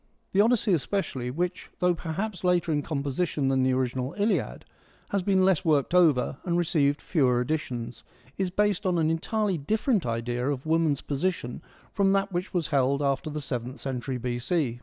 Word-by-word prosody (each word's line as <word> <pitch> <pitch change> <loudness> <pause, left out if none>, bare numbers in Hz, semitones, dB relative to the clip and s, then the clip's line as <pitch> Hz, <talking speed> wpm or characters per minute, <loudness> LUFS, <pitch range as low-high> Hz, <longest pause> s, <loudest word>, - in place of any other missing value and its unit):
The 195 - +4
Odyssey 225 -2 +3
especially, 140 -6 -1
which, 175 +7 -3
though 180 0 +3
perhaps 180 +5 -4
later 180 -2 +2
in 145 -1 +1
composition 140 0 -1
than 135 -1 +2
the 130 0 +2
original 130 0 -1
Iliad, 210 +2 0 0.4
has 200 - 0
been 190 0 +3
less 190 -5 +3
worked 150 -1 +2
over 155 -7 +4
and 175 -1 0
received 155 -5 +2
fewer 130 -8 +2
additions, 125 -4 -3 0.3
is 190 -1 -1
based 205 0 +1
on 180 -1 +2
an 160 -1 +2
entirely 195 +2 -1
different 215 - 0
idea 120 +2 -2
of 140 -1 -3
woman's 160 -3 +2
position 145 -4 -2 0.3
from 195 -1 +3
that 195 0 +1
which 180 +2 -3
was 175 -5 -1
held 140 0 +2
after 140 +2 0
the 150 0 -4
seventh 125 -1 -4
century 130 -1 -3
B.C. 120 +2 -1
155 Hz, 170 wpm, -27 LUFS, 130-180 Hz, 0.4 s, The